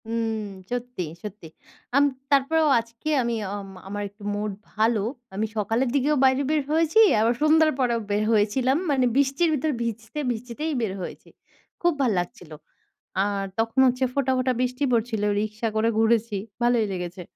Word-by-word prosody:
উম 225 -1 -1 0.3
সত্যি, 245 -5 -3 0.2
সত্যি, 210 -5 -8 0.5
আম 280 - +6 0.3
তারপরেও 305 +3 +3
আজকে 230 +6 -7
আমি 235 0 -1 0.2
অম 200 -1 -6 0.2
আমার 205 +1 -4
একটু 205 +1 -18
মুড 210 0 -2 0.2
ভালো। 220 0 +2 0.3
আমি 215 +3 0
সকালের 225 +5 +1
দিকেও 285 +2 +2
বাইরে 265 +1 +4
বের 310 -1 +2
হয়েছি 325 +5 +3 0.2
আবার 230 +2 +3
সন্ধ্যার 310 +1 +5
পরেও 240 -3 +2
বের 205 +1 +1
হয়েছিলাম। 235 +5 +2
মানে 260 -2 +3
বৃষ্টির 280 +5 +2
ভিতর 305 +1 0
ভিজতে, 230 +4 -4
ভিজতেই 245 +7 -4
বের 215 -4 -1
হয়েছি। - - -8 0.5
খুব 345 0 +3
ভাল 255 -4 +3
লাগছিলো 175 -2 -7 0.7
আর 200 -1 -1
তখন 225 +3 0
হচ্ছে 250 +1 +1
ফোঁটা, 270 -1 +1
ফোঁটা, 255 0 +1
বৃষ্টি 250 +2 -1
পড়ছিলো 225 -3 +1
রিকশা 215 +2 -2
করে 220 +1 +2
ঘুরেছি 225 -1 +2 0.3
ভালোই 240 -2 +3
লেগেছে। 180 0 -5
235 Hz, 155 wpm, -25 LUFS, 215-270 Hz, 0.7 s, আম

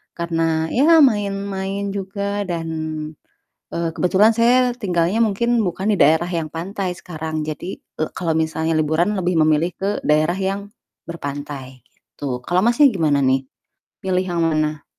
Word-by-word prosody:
karena 165 -1 0
ya 315 +5 +5
main-main 200 -4 0
juga 200 +1 -3
dan, 170 -2 -3 1.1
eee, 170 -1 -1
kebetulan 190 +4 +4
saya 245 +1 +4
tinggalnya 180 -1 0
mungkin 235 +3 +1
bukan 190 +4 -2
di - - 0
daerah 160 +4 +4
yang 165 -3 -2
pantai 185 +2 -3
sekarang. 160 -3 -5
Jadi, 155 +4 -5
eee, 155 - -5
kalau 165 -3 0
misalnya 160 0 0
liburan 160 +6 +1
lebih 180 -1 0
memilih 155 +3 +2
ke 195 - -1 0.2
daerah 155 +4 +2
yang 195 +1 -3 0.4
berpantai 140 -4 -6 0.4
gitu, 130 -3 -3
kalau 180 +1 +2
Masnya, 240 +5 +5
gimana 155 -6 +2
nih? 130 0 +3 0.6
Pilih 185 -1 +1
yang 175 -2 -3
mana? 155 -1 0
175 Hz, 140 wpm, -20 LUFS, 160-200 Hz, 1.1 s, ya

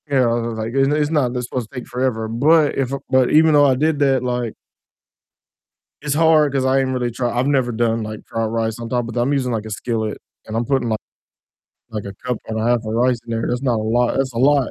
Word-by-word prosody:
You 140 - 0
know, 125 -2 +3
was 115 -1 -2
was, 115 -1 -5
like, 110 +1 -4
it's 135 0 +3
n 145 - +1
it's 150 0 0
not 145 -6 +1
supposed 120 -2 -4
to 135 - -10
take - - -11
forever, 125 -3 -1
but 145 +7 +3
if 135 -2 -1 0.2
but 130 -1 +3
even 160 +1 +5
though 145 -1 +6
I 135 -2 +4
did 155 +2 +1
that, 135 -3 +2
like 125 -2 -2 1.5
it's 145 -1 -2
hard 155 -2 +4
'cause 135 -1 0
I 130 +1 +3
ain't 135 -1 0
really 125 -1 -1
try 120 +1 -2
I've 125 +3 0
never 130 -4 +1
done, 115 0 0
like, 110 0 -7
dried 115 0 -2
rice 115 0 -2
on 115 -1 -6
top, 120 -1 0
but 115 +1 -4
I'm 135 +4 +1
using, 130 -3 0
like, 110 -2 -2
a - - -7
skillet, 110 0 -3 0.3
and 110 - -5
I'm 120 - -1
putting 135 -3 0
like 110 - 0 0.9
like 105 -2 -5
a 100 - -7
cup 125 -3 -1
and 110 0 -3
a 110 - -1
half 120 +1 +3
of 110 -1 -5
rice 125 +1 +2
in - - -10
there, 115 0 -1
that's 125 +1 -2
not 125 -3 +1
a - - -2
lot 120 +2 +1
that's 135 -1 0
a 115 - -4
lot, 140 0 +3
125 Hz, 260 wpm, -20 LUFS, 115-135 Hz, 1.5 s, though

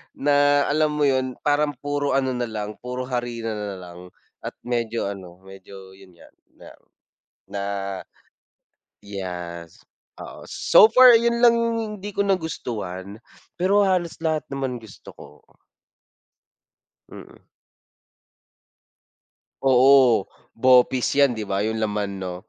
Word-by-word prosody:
na, 145 0 +3
alam 155 0 +1
mo 150 - 0
'yon, 130 -2 0
parang 145 0 +1
puro 145 -1 -1
ano 130 -1 +1
nalang, 110 -4 -5
puro 125 +1 -5
harina 120 -2 -3
nalang 90 -4 -8 0.3
at - - -7
medyo 115 -2 -2
ano, 95 -2 -10
medyo 95 0 -13
'yon 95 -2 -18
nga - - -18 1.2
na 100 - -4 1.4
yes, 90 -4 -8 0.4
oo. - - -10
So 215 - +5
far 255 -1 +8
'yon 235 +1 0
lang 235 -1 +6
yung 230 0 0 0.2
hindi 205 +1 -7
ko - - -8
nagustuhan. 105 - -4 0.4
Pero 190 +3 +2
halos 180 -3 -1
lahat 155 -3 -1
naman 135 -2 -3
gusto 110 -3 -14
ko. - - -17 1.6
Mm. - - -13 2.2
Oo, 130 -2 +5 0.2
bopis 125 +1 +3
'yan, 140 -2 +4
'di 110 -2 -6
ba? 100 +1 -1
Yung 110 +1 -2
laman, 105 -2 -3
'no? 90 -1 -5
125 Hz, 115 wpm, -23 LUFS, 100-145 Hz, 2.2 s, far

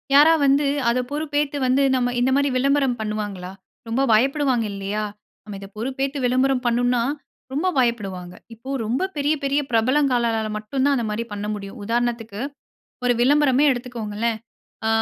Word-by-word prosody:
யாரா 305 +3 +8
வந்து, 280 +2 +3 0.2
அத 245 +2 +1
பொறுப்பேத்து 295 -1 -1
வந்து, 265 +2 +3
நம்ம 245 -1 0
இந்த 255 +2 +2
மாரி 280 0 +2
விளம்பரம் 275 -2 +2
பண்ணுவாங்களா? 205 -4 -4 0.4
ரொம்ப 235 +4 0
பயப்படுவாங்க 260 0 +2
இல்லையா? 200 +2 -3 0.4
நம்ம 205 -2 -8
இத, 195 - -9
பொறுப்பேத்து 270 +4 -2
விளம்பரம் 255 +1 +2
பண்ணுனா 245 0 +2 0.5
ரொம்ப 305 +7 0
பயப்படுவாங்க. 195 -8 -1 0.2
இப்ப, 260 +5 -6
ரொம்ப 260 - 0
பெரிய 290 +1 +1
பெரிய 280 +1 +1
பிரபலங்களால 235 -2 +2
மட்டும் 240 +5 -2
தான், 285 -1 +3
அந்த 235 - -1
மாரி 215 +2 -2
பண்ண 205 0 -4
முடியும். 200 +3 -8
உதாரணத்துக்கு, 230 -2 -2 0.7
ஒரு 245 - +4
விளம்பரமே 285 +1 +4
எடுத்துக்கோங்களேன். 230 -3 -3 0.5
ஆ - - +2
245 Hz, 145 wpm, -22 LUFS, 220-275 Hz, 0.7 s, யாரா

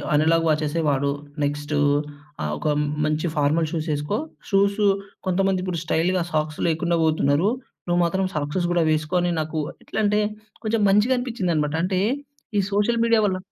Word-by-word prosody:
Analogue 165 +2 +3
వాచెస్సె 155 +1 0
వాడు. 140 0 +1 0.3
Next 145 +1 -1 0.7
ఆహ్, 75 - -1
ఒక - - -3 0.4
మంచి 155 +2 0
ఫార్మల్ 150 +3 +2
షూస్ 160 0 -3
ఎసుకో. 150 +8 -2 0.3
షూసు 200 +1 +2 0.4
కొంతమందిప్పుడు 185 -1 0
స్టైల్‌గా 170 +3 +1
సాక్స్ 155 -1 -1
లేకుండా 170 +1 +1
పోతున్నారు, 155 +3 +2 0.4
నువ్వు 175 0 +2
మాత్రం 190 +3 0
సాక్స్‌స్ 150 +5 -1
కూడా 175 -1 +3
వేసుకొ 155 +3 -1
అని 175 - +1
నాకు 155 0 -2 0.2
ఎట్లా 220 - -4
అంటే, 210 +1 +3 0.5
కొంచెం 220 0 +1
మంచిగా 210 +6 +4
అనిపిచిందన్నమాట. 180 - -1
అంటే 185 0 0 0.6
ఈ 200 - +4
సోషల్ 220 +3 +2
మీడియా 230 -1 +4
వల్ల 185 -2 0
170 Hz, 145 wpm, -23 LUFS, 155-195 Hz, 0.7 s, మంచిగా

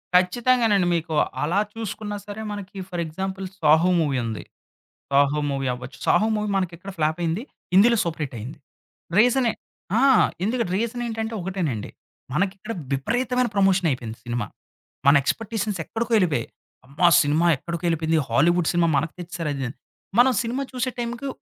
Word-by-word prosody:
ఖచ్చితంగానండి. 210 +1 +3
మీకు 165 -1 -2 0.3
అలా 170 +7 +1
చూసుకున్నా 215 -1 -5
సరే 205 +1 -6
మనకి 205 -1 -7
ఫర్ 175 -2 -3
ఎగ్జాంపుల్ 190 +4 -4
'సాహో' 160 +2 +4
మూవీ 145 -4 0
ఉంది. 110 -2 -4 0.7
'సాహో' 145 +2 +3
మూవీ 135 -1 -2
అవ్వచ్చు. 125 +1 -10
'సాహో' 215 - +4
మూవీ 210 0 -2
మనకిక్కడ 185 +1 -3
ఫ్లాప్ 155 +1 +1
అయింది. 170 +5 -1 0.3
హిందీలో 235 +5 +6
సూపర్ 165 -2 -3
హిట్ 130 -3 -8
అయింది. 120 +8 -8 0.6
రీజనే 245 +1 +4 0.5
ఆ! - - +3 0.4
ఎందుకంటే 230 -3 -1
రీజన్ 235 +2 -2
ఏంటంటే 225 -1 -3
ఒకటేనండి. 175 - -3 0.4
మనకు 185 +6 +1
ఇక్కడ 215 +4 -6 0.2
విపరీతమైన 245 - 0
ప్రమోషన్ 195 -3 +3
అయిపోయింది 120 -4 -4
సినిమా. 120 -2 -2 0.6
మన 140 - +8
ఎక్స్‌పెక్టేషన్స్ 215 - -2
ఎక్కడికో 230 +5 -3
వెళ్ళిపోయాయి. 160 - +1 0.4
అమ్మా! 145 +6 +2 0.2
సినిమా 150 +4 +2
ఎక్కడికో 170 +5 -6
వెళ్ళిపోయింది. 160 -1 +1
హాలీవుడ్ 165 +8 +3
సినిమా 175 -1 +2
మనకు 155 +3 0
తెచ్చేసారు 170 -3 -4
అది 135 -1 -3
అని. 125 - -10 0.4
మనం 255 +2 +6
సినిమా 250 +4 -2
చూసే 255 0 -1
టైమ్‌కి 240 +3 -3
180 Hz, 150 wpm, -24 LUFS, 155-220 Hz, 0.7 s, మన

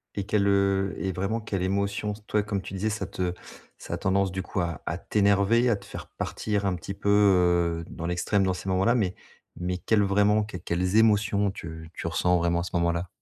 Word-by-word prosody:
et 100 -2 -3
quelle, 105 -1 +1
heu 100 -1 +2
et 95 -1 -2
vraiment, 100 +5 -2
quelle 100 -4 -3
émotion 100 +2 -1
s 105 - -12
toi, 105 - +2
comme 100 -2 -2
tu 95 - -9
disais, 100 +3 -1
ça 105 -2 -3
te 90 -2 -3 0.4
ça - - -7
a - - -1
tendance, 95 0 +1
du 95 0 -3
coup, 95 - -4
à 85 -1 -2
à - - -2
t'énerver, 100 +4 +2
à 110 - +3
te 100 0 -11
faire - - -8
partir 105 -2 -3
un 95 -2 +1
petit 95 +3 -6
peu, 100 - -3
heu, 90 -5 +3
dans 85 - -5
l'extrême, 90 +3 +1
dans 95 -1 +1
ces 95 +1 -6
moments-là 95 +6 +3
mais 95 -6 0 0.4
mais 90 +1 -2
quelles 105 +2 +2
vraiment 105 +2 +3
qu 105 -3 -7
quelles 90 +3 -1
émotions 105 -2 +3
tu 80 -2 -8
tu - - -5
ressens 90 +2 +2
vraiment 85 0 +1
à - - -3
ce - - -6
moment-là? 85 +1 0
95 Hz, 220 wpm, -26 LUFS, 90-105 Hz, 0.4 s, à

